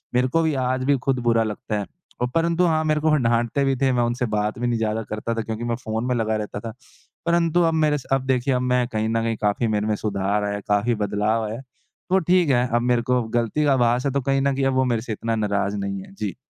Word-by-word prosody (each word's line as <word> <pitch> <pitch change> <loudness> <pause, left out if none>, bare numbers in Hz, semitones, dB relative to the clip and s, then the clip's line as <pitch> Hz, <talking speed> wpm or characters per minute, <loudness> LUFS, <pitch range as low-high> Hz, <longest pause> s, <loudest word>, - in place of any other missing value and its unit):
मेरे 125 +1 +3
को 165 +6 +1
भी 160 -1 +1
आज 130 0 0
भी 140 0 +3
खुद 135 -2 +1
बुरा 115 -1 +4
लगता 105 0 -3
है 100 - -3 0.4
और 125 - +2
परंतु 170 +2 +2
हाँ, 160 -2 +2
मेरे 155 0 +2
को 155 0 +3
डाँटते 120 +1 +1
भी 135 0 +2
थे, 135 +1 +2
मैं 120 -1 +2
उनसे 120 +2 -1
बात 105 +1 -1
भी 120 - 0
नहीं 120 -1 0
ज़्यादा 110 0 -1
करता 110 +2 -3
था 115 - -1
क्योंकि 110 +1 -5
मैं 120 0 -1
फ़ोन 110 -1 -4
में 125 - +1
लगा 110 -2 0
रहता 105 -1 -4
था, 110 +1 -7 0.5
परंतु 170 0 +2
अब 165 -1 +2
मेरे 155 -2 +2
स 135 - -10
अब 135 -1 +1
देखिए 130 +1 +1
अब 125 - +1
मैं 125 -1 +1
कहीं 110 -2 -2
न 115 0 +1
कहीं 115 0 0
काफ़ी 105 +3 +1
मेरे 105 -1 0
में 110 - +1
सुधार 100 0 -1
आया 100 0 -1
है, 105 - -5
काफ़ी 105 +4 +2
बदलाव 105 +2 0
आया 105 - -4
है, 120 - -8 0.5
तो 190 +1 +4
ठीक 180 -2 +2
है, 125 -1 +3
अब 120 - +3
मेरे 120 0 +2
को 125 +1 +1
गलती 115 +6 0
का 140 - +4
आभास 125 0 +2
है, 140 - +1
तो 140 - 0
कहीं 135 +1 +1
न 140 0 +1
कहीं 135 0 0
अब 135 - +2
वो 130 0 +3
मेरे 120 -3 0
से 115 -1 -4
इतना 115 +2 -2
नाराज़ 100 -2 -1
नहीं 100 -1 -3
है। - - -15
जी। 105 -3 -4
120 Hz, 275 wpm, -23 LUFS, 110-135 Hz, 0.5 s, बुरा